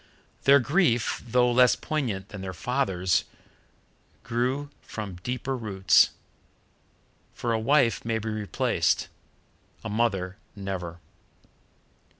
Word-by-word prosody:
Their 140 +1 +7
grief, 135 - +1
though 125 +1 +3
less 125 0 +5
poignant 120 -11 -3
than 100 - -8
their 95 -1 -6
father's, 95 -6 0 1.0
grew 130 +5 -1
from 100 -5 -7
deeper 125 +7 -3
roots, 100 -6 +4 1.3
for 120 -1 -1
a 110 - +1
wife 120 0 +3
may 115 -1 -1
be 110 0 -4
replaced; 105 -2 0 0.7
a 110 - -4
mother 100 -4 0 0.2
never. 95 -4 -5
115 Hz, 105 wpm, -26 LUFS, 95-125 Hz, 1.3 s, Their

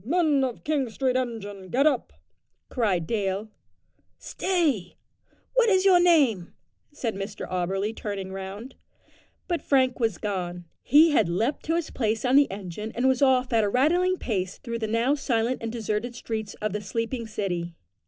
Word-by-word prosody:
"Men 300 - +2
of 250 -3 -3
King 290 -5 0
Street 255 +3 -1
engine 205 -7 -4
get 270 +7 +2
up," 285 -5 +1 0.6
cried 195 -9 0
Dale. 200 +1 -2 0.7
"Stay 305 - -1 0.6
what - - +4
is 380 -2 +3
your 370 -2 +7
name?" 280 - +3 0.4
said 250 -6 -3
Mr 195 +2 -6
Auberly 195 +4 -2
turning 195 -3 -5
round. 195 +6 -7 0.7
But 345 -4 -1
Frank 260 -3 +2
was 225 -7 0
gone. 180 -3 -4 0.2
He 310 +5 +6
had 275 - +3
leaped 225 - 0
to 325 - +1
his 335 -2 -2
place 225 -1 -1
on 250 +1 +3
the 285 0 +6
engine 200 +2 -6
and 245 +2 +2
was 260 0 +2
off 255 -2 +3
at 225 -1 +4
a 205 - +1
rattling 350 - +2
pace 190 - -3
through 235 -3 -5
the 220 - -2
now 230 +5 +2
silent 250 -3 0
and 230 0 -3
deserted 225 +1 -3
streets 220 -3 -5
of 210 -2 -3
the 210 - -2
sleeping 230 +3 -3
city. 175 -5 -3
230 Hz, 165 wpm, -26 LUFS, 200-275 Hz, 0.7 s, your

